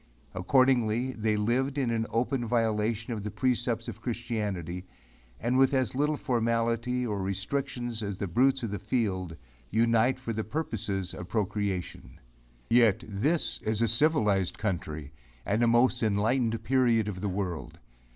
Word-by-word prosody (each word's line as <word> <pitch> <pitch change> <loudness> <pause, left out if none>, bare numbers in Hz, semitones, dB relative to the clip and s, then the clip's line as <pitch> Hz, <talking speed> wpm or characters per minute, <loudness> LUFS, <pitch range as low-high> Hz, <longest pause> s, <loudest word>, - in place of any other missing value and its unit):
Accordingly 125 +3 +2
they 110 -3 0
lived 130 +6 0
in 115 -4 0
open 125 +2 0
violation 115 0 0
of 110 - -4
the 105 - -4
precepts 120 -2 0
of - - -7
christianity 105 -7 -3 0.5
and 125 +3 +1
with 135 +1 +4
as 130 -3 +1
little 150 +3 +1
formality 115 +1 0
or 105 -4 -2
restrictions 120 +5 -2
as 100 -3 -3
the 100 - -2
brutes 130 +8 +2
of 115 - -2
the 105 - -3
field, 95 -8 -1 0.3
unite 115 +3 +3
for 115 -3 -4
the 110 0 -2
purposes 105 - -3
of 90 - -8
procreation. 100 -3 -3 0.5
Yet 115 -3 +4
this 135 +11 0
is 110 0 -1
a - - +3
civilized 110 - +2
country 80 -8 -3 0.3
and 105 +3 +1
a 120 - +4
most 120 +2 +3
enlightened 115 +2 +1
period 120 -2 +3
of 95 -3 -4
the 100 - -1
world! 90 -4 -4
115 Hz, 145 wpm, -29 LUFS, 100-125 Hz, 0.5 s, with